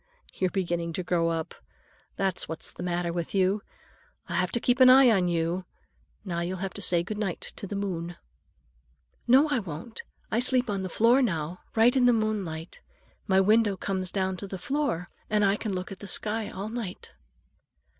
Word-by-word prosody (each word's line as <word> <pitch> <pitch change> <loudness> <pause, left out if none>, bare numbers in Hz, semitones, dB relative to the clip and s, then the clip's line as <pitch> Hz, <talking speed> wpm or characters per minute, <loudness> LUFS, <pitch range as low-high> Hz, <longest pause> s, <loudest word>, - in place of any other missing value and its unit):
"You're 185 - 0
beginning 170 -3 -2
to 185 - -3
grow 170 -1 +1
up, 165 -1 -3 0.6
that's 190 -2 -1
what's 160 - -5
the - - -9
matter 175 -1 -1
with 170 +2 -3
you. 195 +2 +2 0.7
I'll - - -4
have 180 0 +1
to 235 - +1
keep 245 +2 +1
an 255 0 +9
eye 260 -1 +8
on 190 -4 +3
you. 170 +2 -1 0.6
Now 170 -3 -2
you'll 175 +2 -2
have 190 0 -4
to 205 - -8
say 175 -2 +2
good 210 +4 -5
night 195 -5 -3
to 200 - -5
the 205 - -5
moon." 175 -4 -3 1.1
"No, 265 +5 +6
I 285 -4 +2
won't. 185 +3 -7 0.3
I 225 - +2
sleep 250 -2 +2
on 195 -1 -2
the 185 - -4
floor 235 +8 +4
now, 170 - -1 0.2
right 230 +3 +5
in 255 -2 +4
the 245 - +6
moonlight. 200 -8 -2 0.5
My 190 -2 +4
window 210 0 +3
comes 185 -1 -2
down 190 -1 -1
to 200 - -6
the 190 - -5
floor, 265 - -1 0.2
and 210 -1 +3
I 195 0 +3
can 215 0 -4
look 185 +1 -4
at 195 - -8
the 205 - -8
sky 215 +3 0
all 200 +3 -5
night." 225 -5 -6
190 Hz, 195 wpm, -27 LUFS, 175-220 Hz, 1.1 s, an